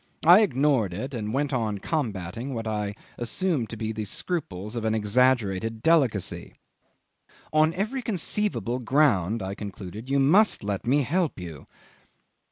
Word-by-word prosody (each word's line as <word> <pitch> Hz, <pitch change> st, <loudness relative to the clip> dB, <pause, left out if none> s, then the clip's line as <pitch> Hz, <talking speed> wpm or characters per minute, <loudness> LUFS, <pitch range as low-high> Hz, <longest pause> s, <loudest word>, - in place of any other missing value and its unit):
I 175 Hz, +4 st, +9 dB
ignored 135 Hz, -, +2 dB
it, 130 Hz, +8 st, -5 dB
and 110 Hz, -3 st, -3 dB
went 140 Hz, +3 st, -1 dB
on 110 Hz, -4 st, -1 dB
combating 115 Hz, -, -3 dB
what 115 Hz, -1 st, -4 dB
I 105 Hz, -2 st, -2 dB, 0.2 s
assumed 130 Hz, -, -1 dB
to 115 Hz, -, -6 dB
be 110 Hz, 0 st, -3 dB
the 110 Hz, -1 st, -4 dB
scruples 105 Hz, -, -4 dB
of 115 Hz, -, -3 dB
an 110 Hz, 0 st, +1 dB
exaggerated 110 Hz, -1 st, +1 dB
delicacy. 135 Hz, -, +1 dB, 1.0 s
"On 155 Hz, +1 st, +4 dB
every 220 Hz, +8 st, -2 dB
conceivable 205 Hz, -, -1 dB
ground," 115 Hz, -, +2 dB
I 95 Hz, +1 st, -4 dB
concluded, 100 Hz, +3 st, -8 dB
"you 140 Hz, 0 st, +2 dB
must 180 Hz, -, +4 dB
let 100 Hz, +1 st, -3 dB
me 140 Hz, +3 st, +3 dB
help 165 Hz, -, -1 dB
you." 80 Hz, -5 st, -9 dB
120 Hz, 145 wpm, -26 LUFS, 105-150 Hz, 1.0 s, I